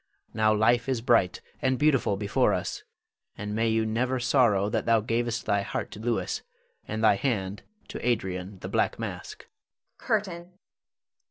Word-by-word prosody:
Now 110 0 +3
life 115 +4 +3
is 130 -3 +1
bright 115 -7 +2 0.2
and 130 -2 +2
beautiful 135 -9 +2
before 100 0 +2
us, - - -4 0.6
and 105 0 -4
may 115 +1 +1
you 110 0 +1
never 125 +4 0
sorrow 120 -6 +3
that 105 - -2
thou 115 -1 +5
gav'st 115 +1 -1
thy 100 0 +2
heart 100 - -4
to - - -9
Louis, 115 +1 -1 0.5
and 110 +1 -3
thy 110 -2 +5
hand 100 -5 -2 0.3
to - - -6
Adrian 95 -5 -1
the - - -5
"Black - - 0
Mask." - - -7 0.5
CURTAIN. 180 -4 -2
115 Hz, 155 wpm, -27 LUFS, 105-125 Hz, 0.6 s, thou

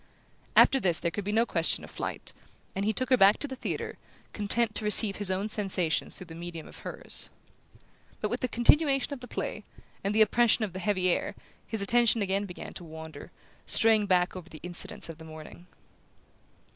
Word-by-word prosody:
After 270 - +6
this 175 -8 +2
there 170 - -2
could 200 +5 -4
be 205 - -2
no 225 +2 +3
question - - 0
of - - -11
flight, - - -5 0.4
and 195 +1 -2
he 215 - +2
took 255 +4 -2
her 255 - +6
back 200 0 +6
to 290 - -1
the 265 - -6
theatre, - - -5 0.3
content 215 +2 +1
to 215 - -2
receive 210 -1 +3
his 205 -2 0
own 190 +2 -1
sensations 195 -6 -1
through 185 - -7
the 165 - -11
medium 170 -1 -8
of - - -12
hers. - - +3 0.9
But - - -3
with - - -1
the 255 - -1
continuation 275 +3 +3
of 280 - -7
the 250 - -10
play, - - -5 0.4
and 200 +2 -1
the 220 - +7
oppression 230 +1 +3
of 190 - -9
the 185 - -5
heavy 185 -2 0
air, - - -2 0.3
his 220 -3 -2
attention 235 0 +3
again 195 +1 -1
began 180 - -9
to 180 - -9
wander, 160 -2 -10 0.4
straying 220 -3 +3
back 180 -1 +2
over 180 -1 -9
the 155 -4 -12
incidents 175 0 -2
of 165 -1 -10
the - - -10
morning. 160 +2 -12
200 Hz, 200 wpm, -28 LUFS, 180-225 Hz, 0.9 s, the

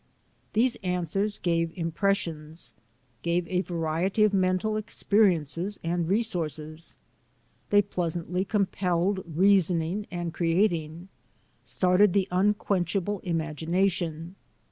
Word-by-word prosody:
These 235 +3 +2
answers 185 +3 -1
gave 165 -1 0
impressions; 165 -2 -2 0.5
gave 170 0 0
a 180 -1 0
variety 175 +4 0
of 210 -1 +3
mental 185 +3 +1
experiences 200 -4 +1
and 170 0 -1
resources. 165 -7 -2 0.7
They 205 0 +5
pleas 175 -4 -3
antly 180 +3 -2
compelled 190 -2 0
reasoning 180 +2 +2
and 175 -2 -4
creating 170 -1 0 0.3
— - - -38 0.3
started 185 +1 +3
the 195 -2 +2
unquenchable 195 0 0
imagination. 165 0 -1
180 Hz, 100 wpm, -27 LUFS, 165-200 Hz, 0.7 s, They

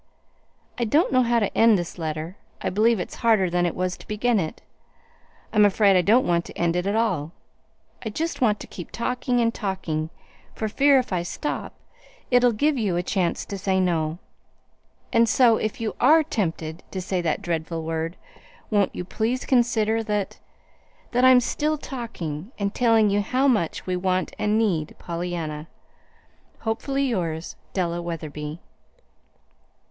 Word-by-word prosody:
"I - - +1
don't 290 +7 +2
know 255 - +5
how 240 -1 +2
to 205 -4 0
end 225 -2 +6
this 175 0 -5
letter. 160 +2 -4 0.2
I - - -2
believe 220 +3 +3
it's - - -5
harder 215 -6 +3
than 175 0 +2
it 170 - -3
was 180 0 -1
to - - -15
begin 220 +1 +1
it. 160 -3 -4 0.9
I'm 210 -1 +5
afraid 200 -1 +4
I 180 - +5
don't 225 +8 +4
want 170 -1 +2
to - - -11
end 170 0 +1
it 180 +2 0
at 200 - 0
all. 180 -9 0 0.7
I 225 - -3
just 320 +9 -3
want 215 -4 +3
to - - -6
keep 175 - -9
talking 250 +1 -1
and 230 -1 +2
talking, 165 -7 -3 0.5
for 220 - -2
fear, 275 +6 +4
if 250 -6 -1
I 180 - +1
stop, 235 +11 -4 0.6
it'll 245 0 +5
give 285 +5 +1
you 195 -6 0
a 175 - 0
chance 180 -2 -1
to 200 - -6
say 190 0 +1
no. 165 -3 0 1.0
And 230 -1 +4
so, 235 -4 +5
if 215 - -3
you 225 -1 -3
ARE 320 +1 +6
tempted 165 - -3
to 190 - -4
say 185 0 -1
that 170 +4 -1
dreadful 165 -2 -2
word, 165 +1 -3 0.5
won't 205 -2 +2
you 180 - -4
please 230 +7 -1
consider 225 -3 +2
that 210 -2 -2 0.7
that 250 +1 +2
I'm 255 -1 +8
still 305 +5 -1
talking, 220 - -6
and 200 0 -1
telling 225 -4 +4
you 205 +1 +2
how 255 +7 +1
much 210 - +1
we 185 - -1
want 185 0 0
and 210 +1 +2
need 175 -9 0
Pollyanna. 170 -3 -4 0.9
"Hopefully 270 +5 -1
yours, 170 -9 -2 0.2
"DELLA 175 -2 -1
WETHERBY." 155 -2 -5
200 Hz, 165 wpm, -24 LUFS, 170-235 Hz, 1.0 s, I'm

